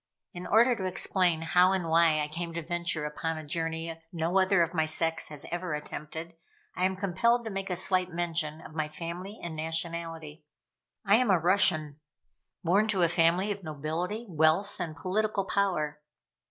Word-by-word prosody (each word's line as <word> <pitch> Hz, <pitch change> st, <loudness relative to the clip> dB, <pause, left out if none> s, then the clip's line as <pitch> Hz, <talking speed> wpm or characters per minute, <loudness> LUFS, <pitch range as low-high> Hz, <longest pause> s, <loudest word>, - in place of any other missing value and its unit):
In 180 Hz, 0 st, -7 dB
order 235 Hz, +3 st, +5 dB
to 190 Hz, -4 st, -4 dB
explain 180 Hz, -2 st, +1 dB
how 180 Hz, +3 st, +4 dB
and 185 Hz, -3 st, -1 dB
why 165 Hz, -1 st, +4 dB
I 150 Hz, -, -1 dB
came 170 Hz, +2 st, -5 dB
to 170 Hz, -, -3 dB
venture 170 Hz, -2 st, -1 dB
upon 160 Hz, +2 st, -3 dB
a 155 Hz, -, -6 dB
journey 165 Hz, +1 st, -3 dB
no 170 Hz, +2 st, +1 dB
other 190 Hz, -2 st, +4 dB
of 165 Hz, -, -3 dB
my 160 Hz, -2 st, +1 dB
sex 165 Hz, +1 st, -1 dB
has 150 Hz, -2 st, -8 dB
ever 175 Hz, -2 st, -2 dB
attempted, 155 Hz, +2 st, -7 dB, 0.4 s
I 180 Hz, -, +1 dB
am 190 Hz, 0 st, 0 dB
compelled 220 Hz, +6 st, +1 dB
to 220 Hz, -, -4 dB
make 195 Hz, 0 st, -4 dB
a 180 Hz, -, 0 dB
slight 185 Hz, 0 st, +1 dB
mention 165 Hz, -2 st, -2 dB
of -, -, -12 dB
my 155 Hz, -1 st, -1 dB
family 170 Hz, +6 st, -7 dB
and 170 Hz, -2 st, -5 dB
nationality. 165 Hz, -1 st, -3 dB, 0.6 s
I 200 Hz, +2 st, +5 dB
am 250 Hz, -2 st, +1 dB
a 190 Hz, -, +5 dB
Russian: 160 Hz, -4 st, +3 dB, 0.6 s
born 195 Hz, +6 st, +3 dB
to 195 Hz, -5 st, +2 dB
a -, -, +5 dB
family 175 Hz, +4 st, +2 dB
of 200 Hz, 0 st, -4 dB
nobility, 165 Hz, +8 st, -4 dB
wealth, 165 Hz, +4 st, +2 dB
and 160 Hz, -2 st, -4 dB
political 195 Hz, +5 st, -1 dB
power. 175 Hz, -8 st, 0 dB
170 Hz, 180 wpm, -29 LUFS, 160-190 Hz, 0.6 s, order